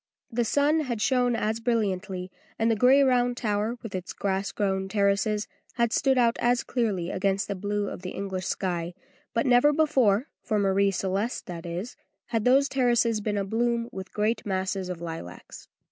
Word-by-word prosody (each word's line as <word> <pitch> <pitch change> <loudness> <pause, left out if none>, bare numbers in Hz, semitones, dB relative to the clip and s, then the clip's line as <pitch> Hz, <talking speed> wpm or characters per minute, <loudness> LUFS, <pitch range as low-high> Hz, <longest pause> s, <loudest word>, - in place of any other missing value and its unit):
The 235 +1 +1
sun 290 +6 +2
had 250 -7 -2
shone 250 0 +2
as 220 0 -1
brilliantly, 195 -5 -1 0.3
and 225 +1 +2
the - - +2
gray 255 +5 +5
round 245 -2 +2
tower, 215 +1 -1
with 225 - -7
its 185 -1 -5
grass 195 0 -2
grown 190 -2 -1
terraces, 205 +1 +1 0.3
had 235 -2 +1
stood 265 -1 +2
out 235 -2 +3
as 245 +1 +2
clearly 200 -8 -1
against 195 0 0
the 200 - -2
blue 205 +1 -2
of - - -6
the 185 - -5
English 190 -2 -4
sky, 175 -2 -2 0.4
but 230 - 0
never 250 +3 +5
before 270 -7 +2
for 215 - -1
Marie 200 0 +3
Celeste, 195 +4 -2
that 175 -2 -7
is 180 +8 -5 0.3
had 225 -2 -1
those 270 +3 +5
terraces 240 -4 +2
been 210 0 -1
abloom 235 +4 0
with 190 0 -8
great 215 +2 0
masses 190 -1 -2
of 175 -2 -5
lilacs. 165 - -8
210 Hz, 175 wpm, -26 LUFS, 190-240 Hz, 0.4 s, gray